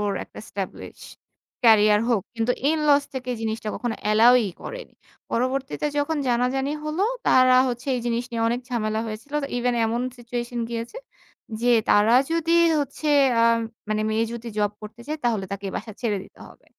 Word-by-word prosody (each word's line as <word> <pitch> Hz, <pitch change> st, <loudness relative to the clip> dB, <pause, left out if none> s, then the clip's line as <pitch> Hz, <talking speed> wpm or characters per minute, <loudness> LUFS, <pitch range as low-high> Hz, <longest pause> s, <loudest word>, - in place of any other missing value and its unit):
ওর 205 Hz, -1 st, 0 dB
একটা -, -, -12 dB
establish 195 Hz, -2 st, -7 dB, 0.6 s
career 210 Hz, -2 st, +6 dB
হোক। 230 Hz, -5 st, +2 dB, 0.2 s
কিন্তু 230 Hz, +2 st, +1 dB, 0.2 s
ইন 320 Hz, -, +1 dB
লস 285 Hz, 0 st, +5 dB
থেকে 255 Hz, -1 st, -4 dB
জিনিসটা 220 Hz, 0 st, -3 dB
কখনো 240 Hz, -2 st, -3 dB
অ্যালাওই 225 Hz, +2 st, +5 dB, 0.2 s
করেনি। -, -, -8 dB, 0.4 s
পরবর্তীতে 265 Hz, +4 st, -1 dB
যখন 305 Hz, +2 st, 0 dB
জানাজানি 255 Hz, +4 st, 0 dB
হল, 305 Hz, +3 st, -4 dB, 0.3 s
তারা 255 Hz, 0 st, +6 dB
হচ্ছে 245 Hz, +2 st, -5 dB
এই 245 Hz, -, -1 dB
জিনিস 235 Hz, +1 st, -1 dB
নিয়ে 230 Hz, -1 st, -2 dB
অনেক 240 Hz, +2 st, -1 dB
ঝামেলা 220 Hz, -3 st, -1 dB
হয়েছিল 220 Hz, +7 st, -8 dB
যে 275 Hz, -, -3 dB
ইভেন 245 Hz, 0 st, 0 dB
এমন 230 Hz, +2 st, -1 dB, 0.2 s
সিচুয়েশন 240 Hz, 0 st, -5 dB
গিয়েছে 235 Hz, -, -5 dB, 0.7 s
যে, 245 Hz, -, +3 dB, 0.2 s
তারা 210 Hz, +3 st, +5 dB, 0.2 s
যদি 330 Hz, 0 st, 0 dB, 0.3 s
হচ্ছে 290 Hz, +2 st, -4 dB, 0.3 s
আ -, -, +5 dB, 0.5 s
মানে 215 Hz, 0 st, 0 dB
মেয়ে 220 Hz, +1 st, +1 dB
যদি 235 Hz, 0 st, -7 dB
জব 205 Hz, -1 st, +1 dB
করতে 220 Hz, +3 st, -10 dB
চায়, 310 Hz, +1 st, -3 dB
তাহলে 220 Hz, -5 st, 0 dB
তাকে 200 Hz, 0 st, -5 dB
এই -, -, -9 dB
বাসা 220 Hz, -, -8 dB
ছেড়ে 215 Hz, -4 st, 0 dB
দিতে -, -, -20 dB
হবে। -, -, -20 dB
235 Hz, 170 wpm, -24 LUFS, 220-255 Hz, 0.7 s, career